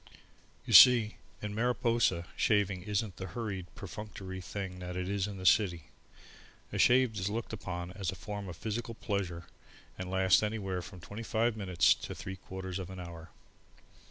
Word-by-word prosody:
You - - -2
see, 120 -4 +9 0.3
in 105 0 -3
Mariposa, 115 -5 +1
shaving 100 -3 +2
isn't 100 0 -2
the 95 - -5
hurried, 100 -6 -3
perfunctory 100 -1 -7
thing 95 0 -5
that 90 0 -6
it 90 0 -2
is 100 0 0
in 100 -1 -6
the 95 - -7
city. 90 -4 +4 0.9
A - - -2
shave 125 -2 +5
is 95 +2 -1
looked 115 +1 -4
upon 90 -4 -5
as 95 -1 -3
a - - -8
form 100 +1 -6
of 85 - -8
physical 115 +2 -4
pleasure 95 -6 -3 0.5
and 95 0 -4
lasts 95 0 +4
anywhere 100 -4 -2
from 90 0 -10
twenty 100 +5 -7
five 115 -1 +1
minutes 95 -6 +4
to - - -7
three 95 0 -6
quarters 95 0 -6
of 95 -1 -6
an 95 -1 -8
hour. 85 -2 -9
95 Hz, 170 wpm, -32 LUFS, 90-110 Hz, 0.9 s, see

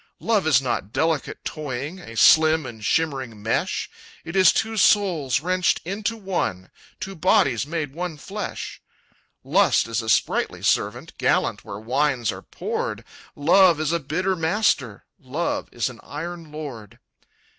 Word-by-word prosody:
"Love 215 -7 +1
is 140 -6 +5
not 110 -5 -2
delicate 160 0 0
toying, 150 +3 -5
A 115 -10 -10
slim 160 +4 +6
and 115 -4 -9
shimmering 130 -6 -1
mesh; 110 - -1 0.4
It 170 - -7
is 190 -1 +7
two 225 0 -1
souls 185 - +3
wrenched 185 +1 +1
into 205 +5 -2
one, 175 - -3 0.3
Two 195 -2 -5
bodies 165 - +2
made 155 -3 -3
one 170 -1 -4
flesh. - - -6 0.6
"Lust - - +3
is 115 +1 -1
a 110 - -5
sprightly - - +1
servant, - - 0
Gallant - - +1
where 100 - -7
wines 125 +2 0
are - - -8
poured; - - -4 0.3
Love 170 +2 +5
is 155 0 0
a 170 - +1
bitter 180 +6 -1
master, 160 - 0
Love 145 +6 -3
is 120 - -1
an 125 -3 -9
iron 165 +1 -7
lord. 135 -9 -8
155 Hz, 145 wpm, -23 LUFS, 125-180 Hz, 0.6 s, is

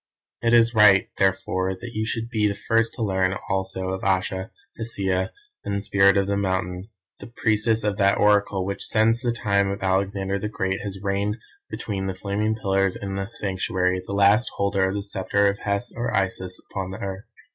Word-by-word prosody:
"It 115 - +2
is 115 0 +5
right, 105 -3 +6
therefore, 95 -1 +1
that 120 +6 -8
you 110 0 -2
should 115 0 -2
be 105 -3 +2
the 100 - -1
first 115 +2 +1
to 115 - -3
learn 95 -2 +1 0.2
also 95 -1 -2
of 95 0 -4
Ayesha, 95 0 0 0.3
Hesea 95 -5 -1 0.3
and 100 0 -2
Spirit 100 -1 +4
of 100 - +2
the 100 +1 -1
Mountain, 95 0 -2 0.3
the - - -9
priestess 110 -1 +1
of 105 -1 -1
that 100 -1 +3
Oracle 100 -2 +2
which 100 +1 -4
since 115 +2 +2
the 120 -2 0
time 100 -3 +1
of 100 0 -4
Alexander 95 +1 0
the 105 - -3
Great 95 -2 -2
has 100 -2 -5
reigned 100 +2 -1 0.3
between 100 -3 -4
the 95 - -3
flaming 105 +3 -1
pillars 95 -3 +1
in 100 -1 -5
the 95 +1 -3
Sanctuary, 95 -3 -1
the 100 - -6
last 100 +4 +4
holder 100 -1 +1
of 95 - -3
the 100 - -2
sceptre 100 0 0
of 100 0 0
Hes 100 +4 -2
or 120 0 -2
Isis 95 -2 -1
upon 95 -1 -3
the 95 - -6
earth. 95 0 -6
100 Hz, 190 wpm, -24 LUFS, 95-105 Hz, 0.3 s, right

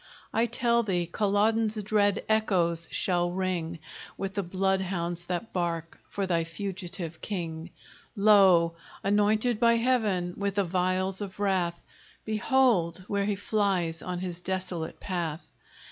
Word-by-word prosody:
I 230 +2 +2
tell 235 0 +2
thee, 180 -6 0
Culloden's 210 +4 +1
dread 205 -1 +2
echoes 175 -6 +1
shall 175 -2 +1
ring 180 -3 -2 0.4
With 195 0 -3
the 200 - 0
bloodhounds 185 -2 -1
that 180 +5 -4
bark 170 -2 -2
for 200 - -2
thy 170 -3 +1
fugitive 175 -1 -6
king. 170 -4 -4 0.5
Lo! 195 -5 +6 0.3
anointed 210 +3 +2
by 235 0 +5
Heaven 220 -8 +1
with 200 -1 -1
the 200 - +3
vials 185 +2 0
of 200 -1 -6
wrath, 185 -4 0 0.5
Behold, 215 -6 +2
where 200 -1 0
he 205 0 0
flies 195 -5 0
on 180 -1 -4
his 180 -1 -5
desolate 180 -3 -4
path! 170 -4 -3
190 Hz, 130 wpm, -28 LUFS, 175-205 Hz, 0.5 s, Lo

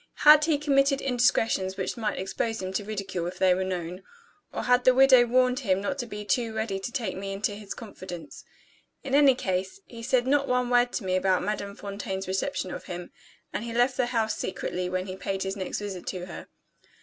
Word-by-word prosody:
Had 300 0 +9
he 315 -3 +2
committed 275 -1 +3
indiscretions 230 -7 +1
which 190 - -2
might 215 -3 -2
expose 220 +4 -2
him 185 0 -4
to 205 - -1
ridicule 195 -4 -4
if 180 +1 -6
they 185 0 +4
were 185 +1 -1
known? 180 -1 -4 0.5
Or - - -4
had 250 0 +3
the 255 0 +5
widow 260 -2 +7
warned 255 +1 +3
him 195 -7 +1
not 275 +8 -3
to 240 - -3
be 210 -1 -7
too 225 0 0
ready 220 -3 -2
to 195 - -5
take 230 -8 -2
me 195 +1 -5
into 200 +2 -1
his 205 -1 -7
confidence? 185 -7 -9 0.6
In 270 -2 -5
any 280 -2 +6
case, 190 - -2
he 230 -1 -10
said 245 +1 +1
not 275 +1 +2
one 250 -1 +1
word 245 0 +4
to 235 - -2
me 185 -1 0
about 185 0 +2
Madame 200 0 -3
Fontaine's 200 -1 -5
reception 190 -1 -2
of - - -7
him, 175 0 -7 0.4
and - - -2
he 235 -1 -5
left 245 +2 +3
the 250 - +1
house 225 -3 0
secretly 180 -1 -3
when 185 0 -2
he 185 -1 -6
paid 190 +1 -3
his 195 +1 -3
next 190 -2 -3
visit 195 -4 -6
to 180 -2 -4
her. - - -9
210 Hz, 215 wpm, -27 LUFS, 190-250 Hz, 0.6 s, Had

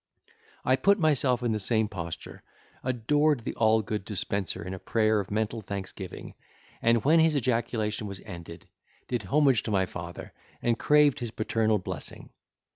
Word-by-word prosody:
I 130 +1 +4
put 200 +6 +4
myself 140 - +2
in 120 - +1
the 110 - 0
same 110 +1 +2
posture, 85 -5 -7 0.4
adored 135 +3 +2
the - - -4
all 110 0 +3
good 105 0 -3
Dispenser 100 -3 -3
in 95 - -5
a 95 - -6
prayer 110 0 +2
of 100 - -4
mental 110 +2 -1
thanksgiving: 95 -2 -7 0.5
and 115 -1 +3
when 160 +3 +6
his 160 -1 +4
ejaculation 115 -4 0
was 100 -1 -7
ended, 85 -4 -9 0.4
did 120 -2 -1
homage 135 +1 +4
to - - -5
my 95 -3 +2
father, 85 -1 -8 0.3
and 115 -1 0
craved 150 -2 +4
his 120 - -3
paternal 110 0 +1
blessing. 90 -5 -7
110 Hz, 160 wpm, -28 LUFS, 100-125 Hz, 0.5 s, when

